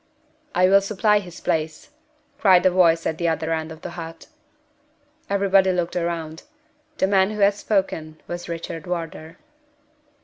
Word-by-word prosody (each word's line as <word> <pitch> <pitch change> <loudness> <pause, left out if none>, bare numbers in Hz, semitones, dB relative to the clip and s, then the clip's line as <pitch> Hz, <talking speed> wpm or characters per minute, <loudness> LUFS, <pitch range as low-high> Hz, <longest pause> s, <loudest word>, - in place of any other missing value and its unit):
"I 185 0 +5
will 195 +1 +6
supply 210 +1 +2
his 180 -3 -10
place," 155 - -2 0.5
cried 190 -6 +5
a 185 - +5
voice 170 -2 +3
at 160 - -2
the 170 - 0
other 160 0 -1
end 160 0 -3
of 160 0 -11
the - - -6
hut. 165 -1 -8 1.0
Everybody 195 -1 +3
looked 175 -2 -1
round. 170 -2 -3 0.6
The - - +2
man 190 0 +3
who 210 -1 -4
had 200 0 +5
spoken 190 -6 -2
was 175 0 -6
Richard 165 -1 -6
Wardour. 165 -2 -5
175 Hz, 150 wpm, -23 LUFS, 165-195 Hz, 1.0 s, will